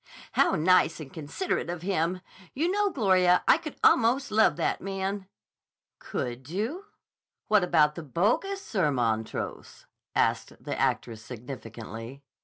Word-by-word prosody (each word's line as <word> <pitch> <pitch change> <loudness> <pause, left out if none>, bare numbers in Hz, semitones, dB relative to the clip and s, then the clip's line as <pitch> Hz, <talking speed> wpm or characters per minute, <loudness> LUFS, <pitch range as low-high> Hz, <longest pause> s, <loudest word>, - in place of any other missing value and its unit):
"How - - +3
nice 170 0 +3
and 145 -4 -9
considerate 160 - -3
of 175 -1 -5
him! 180 -1 0 0.3
You 330 +6 +1
know, 410 +1 +2
Gloria, 185 - +3
I - - +6
could 310 -3 -7
almost 245 +2 +4
love 220 +1 +4
that - - -1
man." 195 0 -3 0.7
"Could 125 +2 -5
you? 230 - -3 0.6
What 210 -3 +5
about 155 -4 +4
the 170 - -7
bogus 225 - 0
Sir 185 -8 +1
Montrose?" 115 -4 -3 0.3
asked - - +1
the - - -4
actress 110 -2 -1
significantly. 115 +1 -8
180 Hz, 130 wpm, -28 LUFS, 135-220 Hz, 0.7 s, I